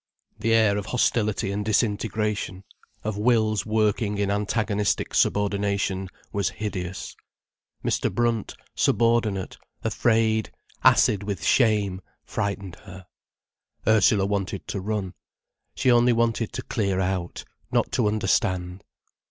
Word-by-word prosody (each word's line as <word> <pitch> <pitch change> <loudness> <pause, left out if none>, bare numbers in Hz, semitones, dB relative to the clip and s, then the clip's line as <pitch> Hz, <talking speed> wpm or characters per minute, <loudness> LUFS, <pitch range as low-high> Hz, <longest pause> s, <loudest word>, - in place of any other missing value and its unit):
The 115 +1 +2
air 105 -2 +3
of 100 - -7
hostility 110 -5 +1
and 105 +1 -2
disintegration, 105 -2 -1 0.4
of 105 -1 -3
wills 110 -3 +2
working 105 -1 +1
in 100 0 0
antagonistic 105 0 0
subordination, 100 -2 0 0.2
was 100 -1 0
hideous. 95 -3 -5 0.7
Mr. - - 0
Brunt, 120 -3 -1 0.2
subordinate, 115 -4 +1 0.2
afraid, 110 -1 +1 0.3
acid 105 - +5
with 100 -1 -4
shame, 105 -6 +2 0.2
frightened 100 -3 -3
her. 95 -2 -12 0.8
Ursula 110 -2 +4
wanted 100 -1 -3
to 100 - -3
run. 100 -2 -3 0.6
She 130 - +3
only 120 0 +5
wanted 115 -1 0
to - - -4
clear 100 -4 -1
out, 90 -2 -2 0.3
not - - +1
to - - +1
understand. 95 -3 0
105 Hz, 110 wpm, -25 LUFS, 100-110 Hz, 0.8 s, acid